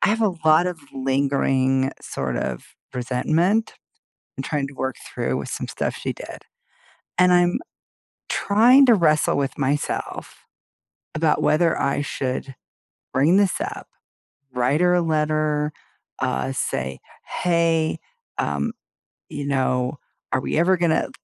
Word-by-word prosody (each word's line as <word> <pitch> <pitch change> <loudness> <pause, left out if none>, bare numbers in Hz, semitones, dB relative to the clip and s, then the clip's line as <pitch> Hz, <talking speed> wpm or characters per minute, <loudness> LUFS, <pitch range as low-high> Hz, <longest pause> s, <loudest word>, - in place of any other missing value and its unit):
I - - +3
have 225 +2 +1
a 210 -3 +3
lot 155 +3 +5
of 180 -2 -3 0.2
lingering 135 0 +1
sort 65 -3 -3
of 60 0 -3 0.3
resentment 155 - +1 0.6
and - - -4
trying 145 -3 -1
to 140 - -13
work 130 -1 -2
through - - -2
with - - -5
some - - -4
stuff - - -3
she - - -4
did, - - -10 0.8
and 180 0 +5
I'm 175 0 +4 0.7
trying 240 +7 +5
to 240 - +7
wrestle 155 -9 +3
with 140 -1 -2
myself 140 +1 -2 0.8
about 155 0 +1
whether 165 +2 +3
I 140 +1 0
should 135 -1 -3 0.6
bring 150 +8 +4
this 200 -2 +2
up, - - -5 0.6
write 130 +5 +1
her 180 0 +4
a 175 - +3
letter, 155 -1 0 0.5
uh, 65 +1 -1
say, 65 0 -3 0.4
"Hey, 165 -2 +2 0.4
um, 70 0 -1 0.6
you 145 - -5
know, 130 -1 0 0.3
are 130 - +2
we - - -2
ever 180 +3 +4
gonna" 170 -2 +1
150 Hz, 135 wpm, -23 LUFS, 130-175 Hz, 0.8 s, to